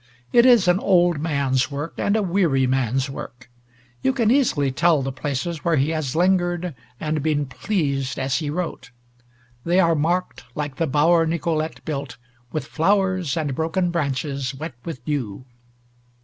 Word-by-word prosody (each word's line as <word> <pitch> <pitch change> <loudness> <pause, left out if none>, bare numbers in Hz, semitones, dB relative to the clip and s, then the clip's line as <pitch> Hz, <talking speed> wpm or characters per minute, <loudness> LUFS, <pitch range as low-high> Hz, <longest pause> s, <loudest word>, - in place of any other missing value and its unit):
It 240 +1 +6
is 235 -7 +6
an 180 +1 +4
old 175 -5 +3
man's 140 -4 0
work, 145 +3 -5
and 200 - +1
a 220 - +2
weary 170 -8 +2
man's 130 +1 0
work. 125 -2 -9 0.5
You 265 - +2
can 230 -4 +2
easily 190 - +2
tell 160 0 +2
the 135 - -2
places 145 +4 -3
where 170 -2 +2
he 140 +2 +1
has 155 -5 -2
lingered, 175 -1 +1 0.3
and 155 -1 -1
been 150 -1 0
pleased 140 -3 -2
as 130 -1 0
he 150 - -3
wrote. 170 -2 -4 0.7
They 175 +2 +2
are 170 -3 +4
marked, 170 +4 -1
like 145 -4 -4
the 165 - 0
bower 165 +4 +3
Nicolete 160 -1 -2
built, 140 -4 -4 0.3
with 155 -4 -3
flowers 185 -2 +1
and 150 -4 -1
broken 165 +5 0
branches 140 -4 -2
wet 150 +1 -6
with 130 -8 -7
dew. 130 -6 -3
155 Hz, 160 wpm, -22 LUFS, 135-175 Hz, 0.7 s, It